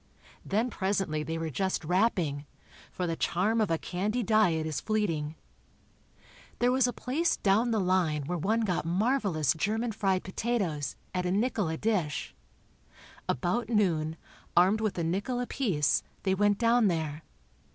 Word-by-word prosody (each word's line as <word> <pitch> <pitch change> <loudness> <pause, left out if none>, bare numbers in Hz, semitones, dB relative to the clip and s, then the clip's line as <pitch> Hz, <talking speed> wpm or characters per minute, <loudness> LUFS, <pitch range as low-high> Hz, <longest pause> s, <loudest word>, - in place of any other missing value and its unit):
Then 225 +5 0
presently 190 -6 -1
they 160 +2 -3
were 165 -1 -3
just 190 +2 -1
wrapping, 175 -6 +1 0.4
for 180 - -3
the 165 -1 -1
charm 210 +8 +1
of 215 - +1
a 165 - +2
candy 205 +9 -2
diet 195 -8 +3
is 155 -2 -3
fleeting. 165 -9 -1 1.2
There 245 +1 +3
was 255 -1 +3
a - - 0
place 275 +8 0
"down 215 +5 +2
the 225 -2 +1
line" 180 -6 +1
where 175 +5 -3
one 220 +8 +1
got 190 -6 0
marvelous 185 - +1
German 220 +8 -1
fried 195 -3 0
potatoes, 185 -8 -2 0.2
at 180 0 -1
a - - 0
nickel 210 -2 +1
a 160 - -2
dish. 190 -9 -1 1.0
About 180 - 0
noon, 165 -8 +1 0.4
armed 190 +5 +5
with 215 -4 -1
a 170 - 0
nickel 200 +9 -1
apiece, 210 - +1 0.2
they 190 - +2
went 205 +1 +2
down 230 0 +4
there. 160 -4 -2
190 Hz, 150 wpm, -29 LUFS, 165-220 Hz, 1.2 s, armed